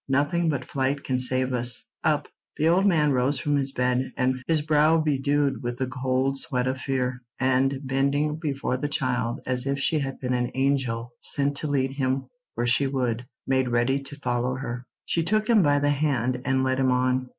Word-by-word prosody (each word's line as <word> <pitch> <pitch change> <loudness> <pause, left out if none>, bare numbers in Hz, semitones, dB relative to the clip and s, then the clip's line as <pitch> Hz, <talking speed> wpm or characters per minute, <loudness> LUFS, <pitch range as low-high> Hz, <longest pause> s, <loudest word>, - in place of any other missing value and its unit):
Nothing 145 +5 +1
but 140 -4 -2
flight 140 +1 -1
can 130 -1 -1
save 130 0 +2
us. 120 -1 +1 0.2
Up!" - - +1 0.3
The 155 - +2
old 190 +4 +4
man 155 -6 +3
rose 130 +2 +2
from 145 +2 0
his 135 -1 -1
bed, 125 0 0 0.4
his 160 -2 +2
brow 155 +1 +4
bedewed 145 -2 +1
with 120 0 -4
the 130 - 0
cold 130 +1 -1
sweat 125 -2 +1
of 130 +1 -2
fear, 130 -2 -2 0.2
and, 130 +1 +2
bending 140 +3 0
before 140 -5 -2
the 145 - -2
child 125 -4 -1
as 130 +1 -2
if 140 0 0
she 155 +3 +1
had 135 -1 -4
been 125 -1 -2
an 125 -1 0
angel 130 -3 0
sent 140 0 +1
to 155 - -2
lead 135 -2 0
him 135 -1 -1 0.3
where 120 - -1
she 130 +3 +3
would, 125 -3 -2 0.2
made 130 -1 +1
ready 120 +3 +1
to 140 +1 -7
follow 125 0 -1
her. 125 -1 -6 0.2
She 165 - 0
took 215 +6 0
him 230 -3 +5
by 145 -4 +3
the 145 0 +2
hand 130 -4 0
and 130 0 +1
led 130 0 0
him 130 -1 +2
on. 125 0 +1
135 Hz, 195 wpm, -25 LUFS, 125-145 Hz, 0.4 s, him